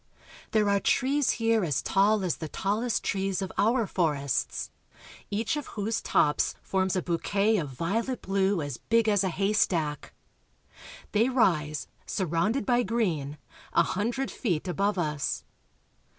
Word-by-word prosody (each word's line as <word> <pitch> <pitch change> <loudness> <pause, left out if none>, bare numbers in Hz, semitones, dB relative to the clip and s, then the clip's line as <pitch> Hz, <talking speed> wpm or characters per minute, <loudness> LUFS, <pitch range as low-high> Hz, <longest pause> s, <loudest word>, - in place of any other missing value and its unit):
There 215 -2 +2
are 200 0 +3
trees 275 +5 +2
here, 225 -2 +2
as 150 -5 0
tall 200 +1 +3
as 180 -4 -1
the 160 - -5
tallest 215 - -1
trees 195 -1 -1
of 190 -2 -3
our 230 +2 +2
for 170 -6 +1
ests, 140 -2 -2 0.6
each 215 +8 -1
of 295 -2 -4
whose 220 +2 -1
tops 150 0 +2
forms 190 -1 0
a 185 - 0
bouquet 200 +5 +1
of 155 -7 -2
violet 215 - -2
blue 195 -2 +1
as 145 -4 -5
big 230 -1 +2
as 205 -2 +3
a 190 - +1
haystack. 175 -6 0 1.0
They 225 +4 +3
rise, 155 - +1 0.2
surrounded 190 - 0
by 245 +1 +3
green, 180 - -1 0.4
a 170 - +5
hundred 235 +10 -2
feet 185 - -2
above 200 +3 0
us. 150 -5 -1
195 Hz, 145 wpm, -28 LUFS, 170-225 Hz, 1.0 s, a